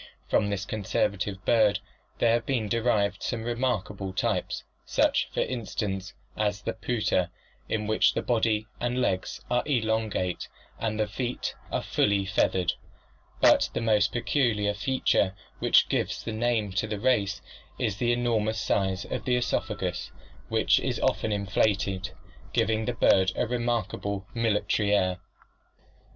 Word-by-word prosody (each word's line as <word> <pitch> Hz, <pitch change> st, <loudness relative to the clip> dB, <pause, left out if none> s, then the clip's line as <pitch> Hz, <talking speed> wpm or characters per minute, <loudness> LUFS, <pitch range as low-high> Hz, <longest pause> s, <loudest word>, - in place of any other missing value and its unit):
From 100 Hz, -, +2 dB
this 100 Hz, -1 st, -2 dB
conservative 100 Hz, -1 st, -1 dB
bird 105 Hz, -3 st, +4 dB, 0.4 s
there 115 Hz, -1 st, +3 dB
have 120 Hz, -1 st, 0 dB
been 120 Hz, -6 st, 0 dB
derived 105 Hz, -3 st, +1 dB
some 115 Hz, -3 st, -2 dB
remarkable 110 Hz, -5 st, -2 dB
types, 95 Hz, -, -1 dB, 0.2 s
such, -, -, +2 dB
for -, -, -1 dB
instance, 100 Hz, -5 st, -3 dB, 0.2 s
as 105 Hz, -1 st, -1 dB
the -, -, -2 dB
pouter, 105 Hz, -6 st, 0 dB, 0.4 s
in 105 Hz, -1 st, -1 dB
which 110 Hz, +1 st, +3 dB
the -, -, -1 dB
body 110 Hz, -3 st, +1 dB
and 120 Hz, +1 st, -1 dB
legs 95 Hz, -7 st, -1 dB
are 125 Hz, 0 st, +3 dB
elongate 110 Hz, -, 0 dB, 0.3 s
and 110 Hz, -1 st, -2 dB
the 110 Hz, -, +3 dB
feet 120 Hz, +4 st, -3 dB, 0.2 s
are -, -, -1 dB
fully 100 Hz, -1 st, +2 dB
feathered; 95 Hz, -1 st, +1 dB, 0.7 s
but -, -, +6 dB
the -, -, +1 dB
most 105 Hz, -3 st, +3 dB
peculiar 115 Hz, -5 st, +1 dB
feature, 100 Hz, -4 st, +1 dB, 0.2 s
which -, -, +5 dB
gives -, -, -1 dB
the 115 Hz, -, -4 dB
name 110 Hz, -2 st, 0 dB
to 100 Hz, +4 st, -1 dB
the 105 Hz, -1 st, -3 dB
race, 105 Hz, -4 st, +1 dB, 0.4 s
is 105 Hz, -2 st, -1 dB
the 120 Hz, +1 st, +1 dB
enormous 115 Hz, -3 st, +1 dB
size 95 Hz, -2 st, 0 dB
of -, -, -4 dB
the 125 Hz, -, +2 dB
oesophagus, 125 Hz, -, -2 dB, 0.4 s
which -, -, +3 dB
is -, -, -2 dB
often 110 Hz, -, +1 dB
inflated, 100 Hz, -1 st, 0 dB, 0.4 s
giving 110 Hz, 0 st, +1 dB
the 125 Hz, -, -1 dB
bird 95 Hz, -4 st, +4 dB
a -, -, +1 dB
remarkable 115 Hz, -5 st, -2 dB
military 105 Hz, -2 st, +1 dB
air. 90 Hz, -2 st, +1 dB
105 Hz, 140 wpm, -27 LUFS, 100-120 Hz, 0.7 s, but